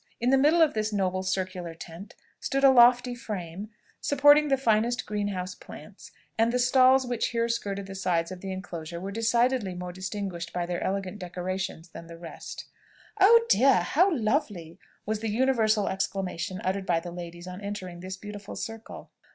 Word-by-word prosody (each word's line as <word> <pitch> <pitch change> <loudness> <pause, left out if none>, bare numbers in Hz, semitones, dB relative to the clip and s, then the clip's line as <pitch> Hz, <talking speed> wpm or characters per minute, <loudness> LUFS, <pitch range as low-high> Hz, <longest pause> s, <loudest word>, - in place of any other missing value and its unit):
In 245 +2 +1
the 270 - +5
middle 315 +4 +5
of 310 - +2
this 215 0 -1
noble 185 -2 0
circular 185 -2 -3
tent 175 +7 -11 0.2
stood 275 0 -2
a 270 - +8
lofty 245 0 +5
frame, 200 -4 -6 0.3
supporting 290 +1 +5
the 270 -1 +2
finest 235 0 +1
greenhouse 200 -3 -3
plants, - - -13 0.3
and 225 +1 +3
the 250 - +1
stalls 255 +1 +5
which 245 -2 -1
here 230 -1 0
skirted 200 -4 -3
the 195 - -8
sides 180 -3 -1
of 185 -1 -8
the 195 - -5
enclosure 170 -3 -6
were 195 +3 -5
decidedly 230 -2 +1
more 180 0 -6
distinguished 185 -2 -5
by 175 -1 -1
their 175 0 -3
elegant 195 +1 -3
decorations 180 -1 -5
than 165 0 -11
the 170 0 -10
rest. 165 -1 -9 0.5
"Oh 455 +4 +7
dear! 270 - +5
how 365 +6 +3
lovely!" 215 - -1 0.3
was 215 0 -2
the 225 0 -3
universal 220 -3 +2
exclamation 185 -2 -3
uttered 190 +1 -2
by 170 -2 +2
the 175 +1 -8
ladies 175 0 -8
on 180 +2 -8
entering 190 -4 -6
this 185 +2 -7
beautiful 205 0 -9
circle. 225 -1 -8
200 Hz, 175 wpm, -27 LUFS, 180-240 Hz, 0.5 s, a